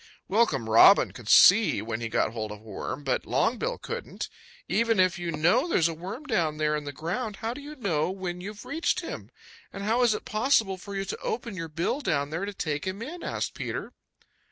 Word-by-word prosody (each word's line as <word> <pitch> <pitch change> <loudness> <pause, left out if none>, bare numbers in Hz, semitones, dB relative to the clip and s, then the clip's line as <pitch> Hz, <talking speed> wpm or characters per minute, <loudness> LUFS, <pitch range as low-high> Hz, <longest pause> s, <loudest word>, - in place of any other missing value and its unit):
Welcome 190 - +2
Robin 115 - +7
could 115 -4 -10
see 205 +3 +7
when 110 +1 -4
he 115 - -3
got 110 - +1
hold 110 -2 -4
of 105 - -7
a 105 - -20
worm, 110 +6 -6
but 130 -2 -1
Longbill - - 0
couldn't. - - -5 0.4
"Even 225 +3 +2
if 185 -1 +3
you 175 -1 -3
know 170 - +2
there - - +1
is 165 - +4
a 165 - -3
worm 190 - -7
down 170 - 0
there 150 0 +1
in 150 -1 -4
the 145 - -4
ground, 185 - -3
how 225 +3 -3
do 285 - -9
you 295 +2 -9
know 175 - 0
when 185 -2 -5
you've 205 +2 -8
reached 325 +1 0
him? - - -7 0.4
And 195 - -7
how 225 +4 +2
is 235 -3 +4
it - - -7
possible 215 -4 +2
for 200 +2 -8
you 195 0 -2
to - - -4
open 445 - -4
your 165 -2 -5
bill 170 - -1
down 145 - -1
there 165 +5 -2
to 205 - -5
take 150 -1 -3
him 195 +4 -4
in?" 335 +7 -7
asked - - -3
Peter. - - -5
185 Hz, 225 wpm, -27 LUFS, 150-225 Hz, 0.4 s, Robin